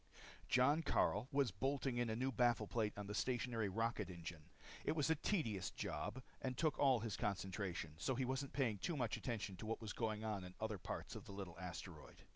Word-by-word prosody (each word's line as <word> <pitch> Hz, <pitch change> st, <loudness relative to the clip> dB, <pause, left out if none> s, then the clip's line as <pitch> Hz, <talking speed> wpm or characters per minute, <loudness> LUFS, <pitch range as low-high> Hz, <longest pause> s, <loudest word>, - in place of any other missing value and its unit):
_ -, -, -22 dB
Jon 140 Hz, +6 st, +5 dB
Karyl 110 Hz, -7 st, +2 dB
was 140 Hz, -4 st, +3 dB
bolting 135 Hz, +4 st, 0 dB
in 120 Hz, -1 st, +2 dB
a 110 Hz, -, 0 dB
new 130 Hz, +3 st, +1 dB
baffle 120 Hz, -2 st, +4 dB
plate 105 Hz, -1 st, 0 dB
on 105 Hz, -, -3 dB
the 105 Hz, -, -4 dB
stationary 120 Hz, -2 st, +1 dB
rocket 115 Hz, 0 st, 0 dB
engine. 85 Hz, -3 st, -7 dB, 0.3 s
It -, -, +2 dB
was 160 Hz, 0 st, +2 dB
a -, -, +5 dB
tedious 115 Hz, -, 0 dB
job 130 Hz, -, -3 dB, 0.2 s
and 130 Hz, -1 st, -2 dB
took 155 Hz, -2 st, +2 dB
all 130 Hz, -5 st, +5 dB
his 115 Hz, -2 st, -2 dB
concentration. 95 Hz, -5 st, -2 dB
So 130 Hz, -, +1 dB
he 130 Hz, +1 st, +1 dB
wasn't 130 Hz, +1 st, -1 dB
paying 115 Hz, -8 st, +1 dB
too 170 Hz, -, -1 dB
much 120 Hz, -4 st, +1 dB
attention 110 Hz, -6 st, -3 dB
to 110 Hz, -, -6 dB
what 115 Hz, -, -1 dB
was 110 Hz, -2 st, -4 dB
going 110 Hz, -2 st, -1 dB
on 105 Hz, -3 st, -1 dB
in 90 Hz, 0 st, -8 dB
other 110 Hz, -2 st, -1 dB
parts -, -, -4 dB
of -, -, -7 dB
the -, -, -8 dB
little 95 Hz, -4 st, -5 dB
asteroid. 85 Hz, -3 st, -7 dB
110 Hz, 215 wpm, -42 LUFS, 100-130 Hz, 0.3 s, Jon